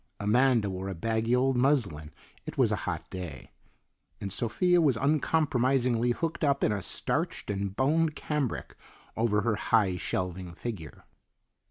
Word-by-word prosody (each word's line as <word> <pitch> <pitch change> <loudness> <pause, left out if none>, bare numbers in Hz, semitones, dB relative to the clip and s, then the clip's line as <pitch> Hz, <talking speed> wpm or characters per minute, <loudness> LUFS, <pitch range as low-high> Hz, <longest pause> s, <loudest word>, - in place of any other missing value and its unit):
Amanda 115 +1 +3
wore 95 0 -4
a 95 - -4
baggy 115 +6 0
old 130 +1 +2
muslin 120 - +1 0.4
(it - - -6
was - - +3
a - - +2
hot - - -4
day), 90 -7 -7 0.7
and 100 -1 -4
Sophia 175 - +2
was 140 -7 +3
uncompromisingly 130 -4 +2
hooked 165 +7 -2
up 140 -1 +2
in - - +3
a 100 -1 -1
starched 95 - -2
and 100 -1 -3
boned 155 +4 +2
cambric 150 -5 -3 0.4
over 110 -2 +2
her 110 -2 0
high 100 -5 +2
shelving 90 -1 -3
figure. 85 - -7
115 Hz, 145 wpm, -29 LUFS, 100-135 Hz, 0.7 s, Amanda